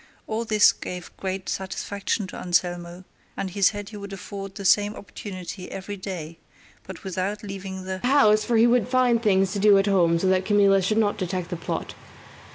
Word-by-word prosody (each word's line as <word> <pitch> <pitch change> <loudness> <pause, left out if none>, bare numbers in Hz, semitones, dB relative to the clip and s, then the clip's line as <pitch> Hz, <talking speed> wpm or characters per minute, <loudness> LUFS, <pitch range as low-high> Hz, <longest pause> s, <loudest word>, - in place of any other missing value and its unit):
All 225 +2 -3
this 215 -2 +5
gave 180 -1 -8
great 190 0 -4
satisfaction 200 +2 -3
to 185 - -9
Anselmo, 175 0 -1 0.3
and 190 - -3
he 200 +2 -6
said 205 +1 +2
he 215 - -9
would 200 -1 -8
afford 195 +1 -7
the 200 -1 -7
same 205 +2 +3
opportunity 185 0 -8
every 195 +2 -6
day, 175 -5 -7 0.5
but - - -9
without 190 +2 -3
leaving 195 -1 -6
the 190 0 -4
house, 215 -4 +4
for 230 +1 +1
he 225 - +6
would 240 -1 +3
find 250 -2 +3
things 195 -3 +2
to 205 - -2
do 205 0 +6
at 195 - +3
home 175 -4 +3
so 170 - -2
that 185 0 +3
Camilla 200 -1 +4
should 215 +4 0
not 210 -2 +1
detect 185 -1 -3
the - - -1
plot. 165 - -4
195 Hz, 190 wpm, -24 LUFS, 185-210 Hz, 0.5 s, he